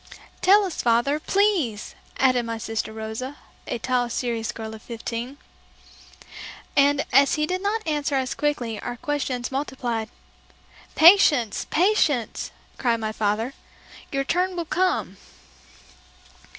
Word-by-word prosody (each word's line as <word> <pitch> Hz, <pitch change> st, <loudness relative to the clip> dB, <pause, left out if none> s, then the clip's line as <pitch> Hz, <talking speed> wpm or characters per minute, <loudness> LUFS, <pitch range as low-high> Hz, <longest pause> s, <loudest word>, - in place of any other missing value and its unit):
"Tell 405 Hz, +3 st, +6 dB
us, 365 Hz, -, -4 dB
father, 240 Hz, +5 st, +2 dB
please," 345 Hz, -, 0 dB, 0.2 s
added 255 Hz, -2 st, +3 dB
my 230 Hz, 0 st, -4 dB
sister 225 Hz, 0 st, -3 dB
Rosa, 220 Hz, +6 st, -6 dB, 0.3 s
a -, -, -2 dB
tall, 245 Hz, +1 st, 0 dB
serious 235 Hz, -2 st, -2 dB
girl 220 Hz, -1 st, -7 dB
of 220 Hz, -, -10 dB
fifteen. 235 Hz, +3 st, -6 dB, 1.4 s
And 285 Hz, 0 st, +4 dB
as 275 Hz, +2 st, +5 dB
he 300 Hz, -, +1 dB
did 365 Hz, +3 st, -2 dB
not 425 Hz, +2 st, -1 dB
answer 295 Hz, -2 st, -1 dB
us 260 Hz, -2 st, 0 dB
quickly 245 Hz, -7 st, -2 dB
our 245 Hz, 0 st, -5 dB
questions 265 Hz, -3 st, -2 dB
multiplied. 250 Hz, -5 st, -3 dB, 0.9 s
"Patience! 310 Hz, -, +5 dB
Patience!" 320 Hz, -, +1 dB, 0.3 s
cried 235 Hz, -3 st, +1 dB
my 215 Hz, -1 st, -2 dB
father; 220 Hz, +4 st, -1 dB, 0.6 s
"your 275 Hz, -2 st, 0 dB
turn 360 Hz, +6 st, 0 dB
will 340 Hz, -1 st, -3 dB
come." 360 Hz, -, 0 dB
260 Hz, 125 wpm, -24 LUFS, 230-300 Hz, 1.4 s, Tell